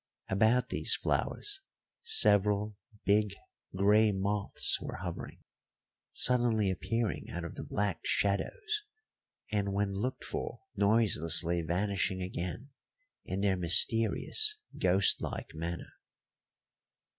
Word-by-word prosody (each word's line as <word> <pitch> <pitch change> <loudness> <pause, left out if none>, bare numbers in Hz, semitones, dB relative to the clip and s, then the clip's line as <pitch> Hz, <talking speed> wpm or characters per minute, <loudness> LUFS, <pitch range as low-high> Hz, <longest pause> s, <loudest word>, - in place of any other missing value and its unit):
About 110 +5 +2
these - - +1
flowers 410 -2 -2 0.4
several 105 - +3 0.3
big, 105 0 +1 0.4
grey 105 +3 +3
moths 100 +1 0
were - - -6
hovering, - - -8 0.7
suddenly 120 -5 +2
appearing 115 +4 -3
out 85 - -6
of 85 - -7
the - - -8
black 100 -4 -2
shadows 415 - -1 0.7
and 100 -2 -1
when 100 0 -1
looked 120 +7 -4
for, - - -6
noiselessly 85 -5 +3
vanishing 95 +3 -1
again 90 +8 -6 0.5
in 95 +1 -4
their 100 -2 +1
mysterious 115 - +4 0.2
ghost 95 +2 +3
like - - -6
manner. 85 +2 -6
100 Hz, 100 wpm, -30 LUFS, 95-110 Hz, 0.7 s, mysterious